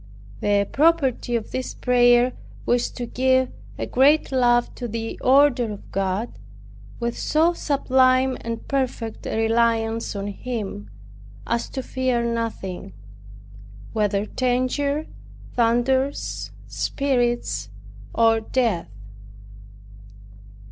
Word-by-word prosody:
The 200 -1 +2
property 280 -6 +2
of 225 -2 -3
this 255 0 -4
prayer 245 0 +4 0.3
was 240 0 +1
to 245 - -6
give 260 +1 +2 0.3
a - - -2
great 285 +5 +3
love 240 -2 +3
to 245 - -5
the 225 0 -5
order 260 -4 +4
of 205 - -12
God, 195 +4 -2 0.6
with 235 0 -2
so 325 +3 +2
sublime 260 -4 +2
and 230 0 -5
perfect 250 -5 -2
a - - -2
reliance 225 0 +1
on 200 0 -3
Him, 205 - -5 0.6
as 235 0 -1
to 265 - -5
fear 255 -2 0
nothing, 225 - -4 1.0
whether 205 -2 +1
danger, 255 +5 0 0.5
thunders, 245 +4 0 0.2
spirits, 245 -4 -1 0.4
or 225 -1 +3
death. 220 - 0
240 Hz, 100 wpm, -23 LUFS, 225-260 Hz, 1.0 s, prayer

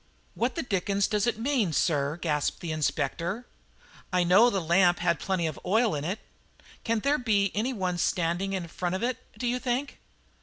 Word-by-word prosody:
"What 240 +2 -1
the - - -2
dickens 200 -2 0
does 210 0 0
it 240 - 0
mean, 230 - 0
sir?" 145 -1 +1
gasped 150 -4 -1
the 170 - -4
Inspector. 165 - -1 0.7
"I 180 -1 +3
know 195 +8 +6
the 200 - 0
lamp 175 +1 +4
had 170 - +1
plenty 185 -3 -1
of 155 -2 -3
oil 220 +4 +2
in 145 -1 -2
it. 185 +7 -2 0.7
Can 225 -1 0
there 285 +4 +2
be 205 -5 +2
any 225 +6 0
one 185 -6 -2
standing 175 +4 0
in 185 -3 -3
front 175 +2 -3
of 190 - -3
it, 250 +1 -1 0.2
do 245 - -4
you 245 +1 0
think?" 255 +3 -2
195 Hz, 190 wpm, -28 LUFS, 170-230 Hz, 0.7 s, know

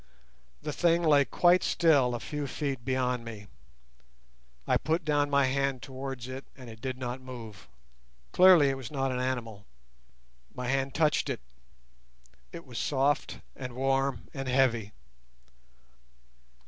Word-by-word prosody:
The 150 - -3
thing 170 +1 +2
lay 145 -3 +5
quite 175 +4 +4
still 140 -8 +3
a - - -4
few 145 +3 -4
feet 135 -2 -3
beyond 125 -1 -1
me. 110 -3 -8 1.2
I - - +3
put 160 +1 -1
down 145 -1 +2
my 140 -1 +3
hand 135 -1 -1
towards 135 -2 -6
it 130 +1 -7
and 125 -3 -10
it 110 0 -14
did 130 -1 -4
not 125 0 -5
move: 120 -6 -10 0.6
clearly 180 -6 +7
it 135 - -2
was 130 -4 -7
not 135 -2 -1
an 125 - -2
animal. 115 -5 -3 0.9
My 125 -1 -4
hand 135 0 -1
touched 155 -1 +2
it. - - -3 1.1
It 170 - -9
was 125 -3 -6
soft 140 0 0
and 130 -2 -7
warm 135 -1 0
and 135 -1 -5
heavy. 120 -5 +2
135 Hz, 140 wpm, -29 LUFS, 125-145 Hz, 1.2 s, clearly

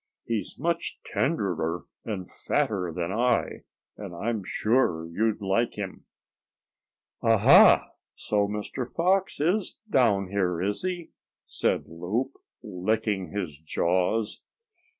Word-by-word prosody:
He's 115 -3 -3
much 170 +3 -1
tenderer 90 - -1 0.2
and 95 -5 -4
fatter 90 -5 -1
than 85 +2 -3
I, 120 +3 0 0.3
and 100 -4 -7
I'm 110 +3 -2
sure 105 -5 +1
you'd 105 +6 0
like 100 +5 0
him." 100 -2 -6 1.2
"Ah! - - +4
Ha! - - +7 0.3
So 105 -1 0
Mr. 105 +5 -4
Fox 190 +3 +1
is 180 +7 0
down 110 - +3
here, 90 -3 0
is 100 +3 -1
he?" 180 -2 -3 0.3
said - - 0
Loup, 95 - -2 0.3
licking 105 0 -1
his 90 -4 -4
jaws. 90 +7 0
105 Hz, 110 wpm, -27 LUFS, 90-120 Hz, 1.2 s, Ha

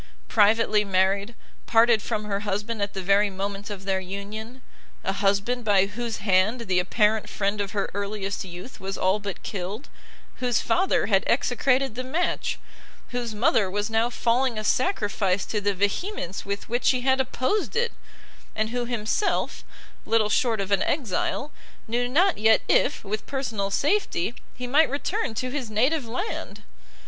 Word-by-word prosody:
Privately 215 0 +4
married, 195 +3 +1 0.3
parted 230 -1 +5
from 215 -1 -2
her 200 -1 -1
husband 205 +2 -2
at 200 0 -1
the 190 - -4
very 200 +2 +4
moment 200 +2 -4
of 195 -2 -7
their 190 -1 +1
union, 210 +6 -7 0.4
a 195 - 0
husband 200 +5 +1
by 200 -3 +4
whose 225 +3 -4
hand 200 +4 +2
the 190 -5 +1
apparent 210 +4 +1
friend 200 +1 -1
of 200 -1 -4
her 200 -1 0
earliest 200 0 -3
youth 180 +6 -9
was 195 +1 -4
all 190 +3 +2
but 200 -2 -6
killed, 200 +6 -5 0.5
whose 245 -3 +1
father 375 +2 +2
had - - +3
execrated 270 -2 +2
the 255 +3 -4
match, 315 +8 -1 0.5
whose 240 -3 -3
mother 210 -3 +3
was 205 +3 -2
now 225 +2 +2
falling 240 0 +1
a 215 - -2
sacrifice 205 - +1
to 210 - -2
the 205 0 0
vehemence 200 - -2
with 200 0 -4
which 240 +2 -1
she 255 -1 +3
had 265 +1 +3
opposed 265 - -1
it, 475 0 +1 0.6
and 215 0 0
who 245 0 -1
himself, 240 - -1 0.4
little 225 -2 +3
short 225 -1 +2
of 195 0 -3
an 200 -1 +3
exile, 280 +2 -1 0.4
knew 245 +2 0
not 350 - +3
yet 220 +1 +5
if, 285 - +2
with 210 +1 -4
personal 235 -8 -2
safety, 280 - +1 0.2
he 250 - -5
might 290 +5 +4
return 290 - -2
to 255 +3 -2
his 265 -5 -3
native 255 +6 +1
land! 255 - -5
215 Hz, 160 wpm, -25 LUFS, 200-250 Hz, 0.6 s, parted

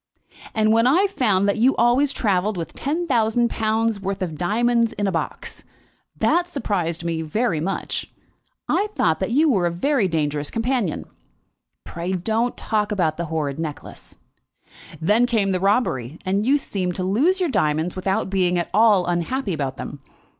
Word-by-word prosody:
"And 215 -1 +3
when 230 +2 +4
I 345 +10 +4
found 210 - +1
that 200 - 0
you 255 +4 +4
always 245 +4 +3
travelled 205 -4 0
with 165 - -5
ten 320 +6 -2
thousand 235 -3 +1
pounds' 220 -1 0
worth 195 0 -3
of 165 -4 -4
diamonds 230 +7 +1
in 205 - -2
a 195 - +1
box, 165 - -4 0.5
that 350 +1 +2
surprised 185 - -2
me 165 -1 -2
very 165 +3 -1
much. 190 +5 -3 0.6
I 415 - +1
thought 160 -1 +1
that 190 - -1
you 295 +7 +3
were 195 - +2
a - - -1
very 235 - +1
dangerous 150 -3 -1
companion." 230 - -1 0.8
"Pray 170 +3 -4
don't 220 +6 -1
talk 210 -1 -1
about 170 -6 0
the 170 - -2
horrid 155 -3 -3
necklace." 155 -3 -7 0.8
"Then 210 +9 +3
came 215 -5 +1
the 185 - 0
robbery, 180 - 0
and 200 +4 0
you 280 +2 +5
seemed 185 -10 -3
to 185 - -3
lose 275 - +2
your 360 -3 +1
diamonds 155 - 0
without 190 0 -1
being 180 -2 +2
at 175 - -2
all 210 -3 +5
unhappy 180 +6 -1
about 140 -4 -3
them. 145 - -8
200 Hz, 170 wpm, -22 LUFS, 170-235 Hz, 0.8 s, you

